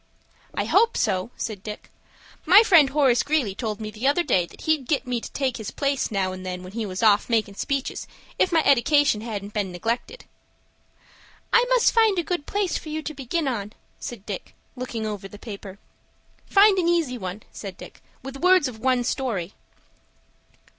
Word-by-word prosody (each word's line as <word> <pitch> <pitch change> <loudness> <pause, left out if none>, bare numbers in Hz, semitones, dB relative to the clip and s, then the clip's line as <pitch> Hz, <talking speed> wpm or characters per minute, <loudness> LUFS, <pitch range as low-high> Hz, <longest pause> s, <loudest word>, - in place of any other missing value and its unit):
"I - - -1
hope 460 0 +3
so," 185 +3 0
said 215 -5 -4
Dick. 210 +1 -8 0.5
"My 385 +7 +8
friend 330 -10 +6
Horace 270 -4 +3
Greeley 290 -10 0
told 215 0 -4
me 215 -1 -5
the 220 +5 -2
other 290 +5 +3
day 180 - +1
that - - -16
he'd 310 -5 0
get 285 -2 0
me 245 -2 -2
to - - -8
take 265 -3 -1
his 220 -3 -5
place 280 -1 -1
now 195 -3 -1
and 185 0 -7
then 180 -1 -5
when 185 - -9
he 220 0 -3
was 185 +2 -4
off 210 0 +4
makin' 220 -4 +1
speeches 275 +6 -3 0.3
if 370 - +3
my 325 -2 +3
edication 280 -3 +3
hadn't 210 -3 -6
been 205 -3 -2
neglected." 230 - -4 1.3
"I 480 - +6
must - - +4
find 445 -4 +4
a 345 - +1
good 345 -4 -3
piece 405 -3 -1
for 310 - -10
you 310 +1 -4
to 310 - -5
begin 280 +3 -2
on," 210 -5 -3 0.3
said 235 -5 -7
Fosdick, 200 -3 -7 0.2
looking 245 -3 -4
over 205 -2 -5
the 205 - -12
paper. 200 -3 -9 0.7
"Find 400 -1 +5
an 345 - +1
easy 325 -8 +1
one," 185 +2 -6
said 195 -3 -8
Dick, - - -12 0.2
"with 270 +1 -7
words 365 -1 +4
of 235 -3 -8
one 255 +1 +1
story." 225 -8 -2
245 Hz, 190 wpm, -24 LUFS, 205-310 Hz, 1.3 s, My